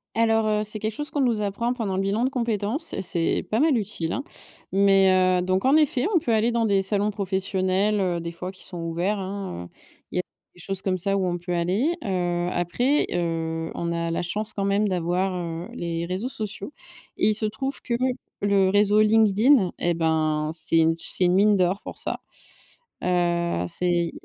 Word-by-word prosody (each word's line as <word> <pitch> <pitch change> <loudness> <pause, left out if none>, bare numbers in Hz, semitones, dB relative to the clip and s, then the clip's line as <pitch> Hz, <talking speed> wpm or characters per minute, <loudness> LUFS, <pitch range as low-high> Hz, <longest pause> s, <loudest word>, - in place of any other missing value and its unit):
Alors 225 -1 +3
heu, 210 0 +1
c'est 215 0 -2
quelque 215 +1 -3
chose 295 +1 -5
qu'on 290 - 0
nous 235 -4 +1
apprend 210 +4 -1
pendant 210 -6 -3
le 190 - 0
bilan 200 +4 0
de - - +1
compétences 235 - -2
et 195 - -3
c'est 175 0 0
pas 220 - +2
mal 300 -4 +4
utile 195 -6 -3
hein, 275 - -3 0.5
mais 190 -2 +4
heu, - - 0
donc 185 +3 0
en 270 +3 +5
effet, 300 0 +3
on - - +7
peut 235 -6 -1
aller 220 +2 +2
dans 230 -1 +1
des 200 -2 +3
salons 205 +2 +1
professionnels, 195 +1 0
heu, 180 -2 0
des 170 0 -5
fois 180 +2 -6
qui 190 - -13
sont 180 -2 -7
ouverts 175 +5 -1
hein, 190 - -5
heu, - - -14 0.4
il - - -8
y - - +3
a 180 - 0 0.3
des 180 - -17
choses 195 +2 -3
comme 185 -1 0
ça 195 +3 0
où 190 -2 0
on 175 0 -1
peut 175 +1 -5
aller, 185 - +1
heu, 175 -3 -1
après, 240 - +1
heu, 165 -1 -2
on 170 0 -2
a 170 0 -1
la 165 - -1
chance 210 +5 -3
quand 195 - -2
même 200 +1 +2
d'avoir, 180 +1 0
heu, 170 -1 -4
les 170 -3 -3
réseaux 185 +7 -2
sociaux 215 +2 -5 0.4
et - - +3
il 215 - +3
se 215 - 0
trouve 265 +6 -3
que 240 - -3 0.5
le 200 -2 +3
réseau 205 +1 +4
LinkedIn 215 +1 +4
et 175 - +1
ben 155 -2 0
c'est 165 0 0
u 165 0 +3
c'est 180 - +1
une 180 +1 +3
mine 210 +1 +5
d'or 185 +1 +1
pour - - -7
ça, - - -2 0.8
heu, 175 - +1
c'est 175 - 0
195 Hz, 210 wpm, -24 LUFS, 175-215 Hz, 0.8 s, on